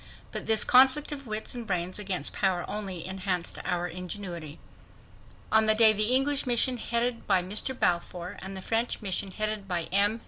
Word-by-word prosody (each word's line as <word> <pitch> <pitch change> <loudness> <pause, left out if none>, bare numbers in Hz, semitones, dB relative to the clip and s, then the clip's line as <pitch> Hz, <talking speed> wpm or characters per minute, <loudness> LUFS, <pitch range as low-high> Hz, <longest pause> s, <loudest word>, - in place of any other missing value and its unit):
But - - -5
this 220 -1 +5
conflict 265 +4 +5
of 275 -3 -7
wits 215 0 -4
and 240 -2 -6
brains 180 +1 -2
against 190 -7 -3
power 185 -3 0
only 195 -5 -5
enhanced 185 -2 -3
our 175 0 -2
ingenuity. 175 -3 -7 0.9
On 220 0 +4
the 215 - +5
day 220 -1 +7
the 215 +4 +4
English 275 +1 +2
mission 250 +1 +2
headed 235 +1 -2
by 190 -3 +3
Mr. 215 +7 -1
Balfour, 175 0 -1
and 190 0 -7
the 190 - -8
French 230 0 -1
mission 195 0 -1
headed 215 0 -3
by 175 -3 -1
M. 205 +4 +3
205 Hz, 175 wpm, -27 LUFS, 180-230 Hz, 0.9 s, day